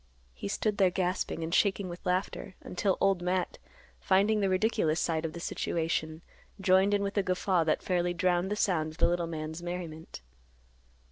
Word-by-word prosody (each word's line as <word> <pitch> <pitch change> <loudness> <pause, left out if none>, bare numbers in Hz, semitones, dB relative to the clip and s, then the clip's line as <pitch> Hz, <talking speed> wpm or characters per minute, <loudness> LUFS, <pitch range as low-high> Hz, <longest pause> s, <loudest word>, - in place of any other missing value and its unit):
He 65 +11 -6
stood 210 - -1
there 190 -2 +5
gasping 180 -2 -1
and 165 +1 -4
shaking 200 -1 +2
with 175 0 -8
laughter, 185 +1 -2
until 190 +1 -1
Old 195 -2 +2
Matt, 180 +1 -1 0.4
finding 200 +3 +3
the 195 -2 +1
ridiculous 185 -5 +1
side 165 -1 0
of 160 - -4
the 170 - -7
situation, 160 -1 -2 0.4
joined 190 +1 +4
in 200 - 0
with 200 +1 -3
a - - +5
guffaw 185 -1 +1
that 155 - +1
fairly 175 -1 0
drowned 175 +1 +1
the 210 - -1
sound 160 -7 0
of - - -16
the - - +4
little 175 -1 0
man's 160 0 -5
merriment. 170 - -6
180 Hz, 180 wpm, -30 LUFS, 165-190 Hz, 0.4 s, there